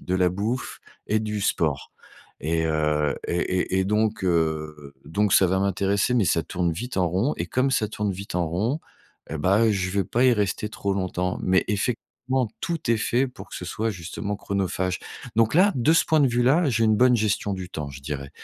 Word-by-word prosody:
de 90 - -3
la 90 -1 +3
bouffe 110 +7 -3 0.3
et 110 - +2
du 105 -1 -3
sport 75 -9 0 0.5
et, 80 +2 0
heu 75 -2 +1
et 85 - -1
et 90 +1 0
et - - +1
donc, 105 0 0
heu, 75 -4 -1
donc, 100 +2 +1
ça 95 - +6
va 95 +2 +1
m'intéresser, 100 +4 +1
mais 115 -5 +3
ça 85 -2 +2
tourne 85 -2 -1
vite 120 +8 -6
en 90 -2 +2
rond. 100 - 0
Et - - -2
comme 130 +2 +1
ça 110 -4 +1
tourne 105 -1 -2
vite 100 0 -7
en 90 -2 +1
rond, 110 - -1 0.5
et 80 - -4
bah, 100 +8 +3
je 95 -2 -1
vais 100 -1 0
pas 120 +7 +1
y 125 - +6
rester 105 0 -1
trop 100 -3 -2
longtemps. 90 -1 -2
Mais 95 0 +3
effectivement, 125 +3 -2
tout 165 -8 -2
est 115 - +4
fait 120 +4 +1
pour 125 - -12
que - - -6
ce - - -6
soit 110 +4 -2
justement 100 +3 -5
chronophage. 95 -2 -2 0.4
Donc 115 -1 +3
là, 195 +4 +6
de 135 +5 +3
ce 165 - +4
point 155 -1 +3
de 135 - +4
vue 120 +1 +1
là, 145 +4 +3
j'ai 115 -1 +2
une 110 -1 +3
bonne 125 0 +5
gestion 105 -1 0
du 95 -1 -5
temps, 75 -5 -5
je 70 - -10
dirais. 70 -1 -5
100 Hz, 215 wpm, -24 LUFS, 90-115 Hz, 0.5 s, ça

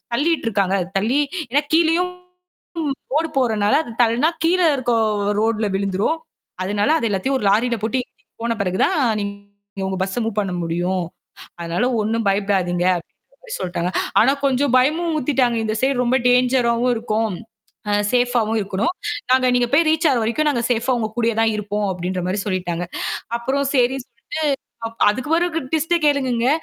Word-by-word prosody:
தள்ளிட்ருக்காங்க. 230 - +1 0.2
தள்ளி 245 +8 +1 0.3
ஏன்னா, 290 +4 +3
கீழயும் 340 +2 +3 1.0
ரோடு 320 +2 +1
போறனால 220 -5 +2
அது 235 - -9
தள்ளனா 240 +7 +3
கீழ 355 +3 +3 0.2
இருக்குற 245 -3 0 0.4
ரோட்ல 220 -1 +1
விழுந்துரும். 200 +10 0 0.4
அதனால, 205 +7 0
அதை 230 - -1
எல்லாத்தையும் 235 +8 0
ஒரு 225 - -5
லாரியில 235 +4 +2
போட்டு 240 +4 0
ஏத்திட்டு - - -41
போன 235 0 0
பிறகு 185 0 -2
தான் 375 - 0 0.2
நீங்க 200 -1 -8
உங்க 190 0 -2
பஸ் 190 +4 -2
மூவ் 225 -1 -3
பண்ண 195 -3 0
முடியும். 175 +2 -1 0.6
அதனால 170 +6 -1
ஒண்ணும் 220 +1 -1
பயப்படாதீங்க 195 -3 +1
அப்படின்ற 175 - -11
மாரி - - -8
சொல்லிட்டாங்க. 180 -1 -2 0.3
ஆனா 260 +5 +5
கொஞ்சம் 270 -1 +1
பயமும் 320 +6 +1
ஊத்திட்டாங்க. 255 -4 +1
இந்த 215 0 -1
சைடு 270 0 +2
ரொம்ப 250 +2 +2
டேஞ்சராவும் 250 -1 +3
இருக்கும். 220 -2 -1 0.5
ஆ - - +1 0.2
சேஃபா 245 0 +2
ஆவும் 220 +1 0
இருக்கணும். 200 - -1 0.4
நாங்க 255 -1 +4
நீங்க 245 -1 +2
போயி 320 +2 +4
ரீச் 320 +1 +2
ஆகுற 245 -3 +1
வரைக்கும், 300 +7 +1
நாங்க 250 -5 0
சேஃபா 245 +2 +1
உங்க 220 -1 -2
கூடயேதான் 225 -1 +2
இருப்போம் 210 0 -2
அப்படின்ற 180 +1 -3
மாரி 190 +3 -1
சொல்லிட்டாங்க. 180 -3 -2 0.5
அப்புறம் 265 +4 -1
சரின்னு 255 0 +1
சொல்லிட்டு, 230 0 -42 0.6
அப் 230 - -1
அதுக்கு 260 +9 -1
ஒரு 350 +1 +1 0.2
ட்விஸ்ட்ட 320 +2 +2
கேளுங்கங்க. 260 -4 +1
230 Hz, 155 wpm, -20 LUFS, 200-265 Hz, 1.0 s, ஆனா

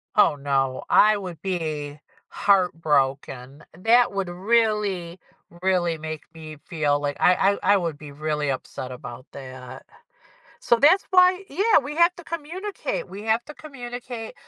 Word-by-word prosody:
Oh, 210 - +5
no. 135 -2 -1
I 215 0 +5
would 180 -5 -8
be 155 -6 -4 0.3
heartbroken. 145 -7 0
That 235 +5 +4
would 195 -2 -3
really, 195 -3 0 0.4
really 180 -3 +1
make 155 -1 -6
me 155 -2 -10
feel 150 -3 0
like 145 -1 -2
I 185 +2 +4
I 205 - +5
I - - +5
would 165 -5 -3
be 150 -1 -11
really 150 0 -2
upset 130 0 -6
about 125 0 -9
that. 130 -2 -10 0.7
So, 235 - +3
that's 315 +10 +5
why 365 +1 +5
yeah, 430 +4 +3
we 285 - -5
have 340 +1 +4
to 345 - -12
communicate, 370 +9 -5
we 200 +2 -8
have 225 +2 +1
to 300 - -10
communicate 245 -5 -8
180 Hz, 145 wpm, -24 LUFS, 150-235 Hz, 0.7 s, Oh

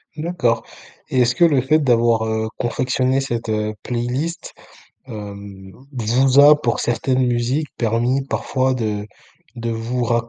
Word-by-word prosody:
D'accord 150 -8 -1 0.5
et 130 - 0
est-ce 120 0 +2
que 175 - +5
le 145 -6 +3
fait 155 +5 +2
d'avoir, 120 -5 +2
heu, 110 0 -2
confectionné 130 +2 0
cette, 120 -4 -4
heu, 105 0 -1
playlist, 125 +8 -3 0.5
hem, 100 -4 -9 0.2
vous 130 +2 +2
a, 150 +1 +7
pour 120 -5 0
certaines 125 +2 0
musiques, 125 +5 0
permis 120 +4 0
parfois 130 -1 -1
de 105 -4 -3 0.5
de 115 0 -3
vous 115 +2 -2
ra 115 0 0
120 Hz, 140 wpm, -20 LUFS, 115-130 Hz, 0.5 s, a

